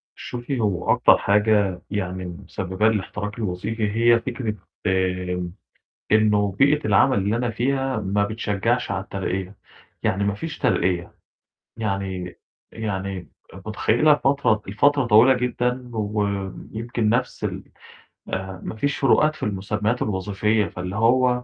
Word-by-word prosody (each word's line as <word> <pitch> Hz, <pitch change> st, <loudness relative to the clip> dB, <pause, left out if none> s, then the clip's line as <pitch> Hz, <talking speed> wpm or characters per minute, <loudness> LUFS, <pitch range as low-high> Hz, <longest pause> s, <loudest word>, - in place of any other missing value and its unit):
شوفي 125 Hz, +1 st, -4 dB
هو 100 Hz, -5 st, +1 dB
أكتر -, -, +5 dB
حاجة 100 Hz, -3 st, +2 dB
يعني 95 Hz, -3 st, -3 dB
مسبّبة 95 Hz, +3 st, -2 dB
لي 110 Hz, -, +2 dB
الاحتراق 105 Hz, 0 st, -3 dB
الوظيفي، 105 Hz, +2 st, -2 dB
هي 115 Hz, +1 st, +4 dB
فكرة 120 Hz, -4 st, -3 dB, 0.3 s
آمم، 90 Hz, -2 st, -1 dB, 0.6 s
إنه 105 Hz, -2 st, +3 dB
بيئة 140 Hz, +8 st, +3 dB
العمل 130 Hz, -4 st, +4 dB
اللي 100 Hz, +3 st, 0 dB
أنا 120 Hz, 0 st, -1 dB
فيها 135 Hz, +3 st, 0 dB
ما 100 Hz, +2 st, +1 dB
بتشجّعش 105 Hz, -2 st, -1 dB
على -, -, -2 dB
الترقية، 95 Hz, +1 st, -4 dB, 0.5 s
يعني 100 Hz, +2 st, +1 dB
ما 100 Hz, 0 st, 0 dB
فيش 160 Hz, +8 st, -6 dB
ترقية 90 Hz, -1 st, 0 dB, 0.6 s
يعني 95 Hz, -4 st, -3 dB, 0.3 s
يعني، 95 Hz, -4 st, -4 dB, 0.4 s
متخيّلة 120 Hz, +7 st, +3 dB
الفترة 135 Hz, -7 st, +2 dB
الفترة 140 Hz, +7 st, +3 dB
طويلة 115 Hz, +5 st, +6 dB
جدًا، 125 Hz, 0 st, -1 dB
ويمكن 105 Hz, +2 st, -2 dB
نَفْس 125 Hz, +3 st, 0 dB
ال -, -, -3 dB, 0.7 s
آآ 95 Hz, 0 st, -4 dB
ما -, -, -5 dB
فيش 140 Hz, +6 st, -1 dB
فروقات 150 Hz, +2 st, +3 dB
في -, -, -9 dB
المُسمّيات 105 Hz, +3 st, -1 dB
الوظيفية. 105 Hz, +2 st, 0 dB
فاللي 90 Hz, +2 st, -6 dB
هو 125 Hz, +2 st, +3 dB
105 Hz, 125 wpm, -23 LUFS, 95-120 Hz, 0.7 s, طويلة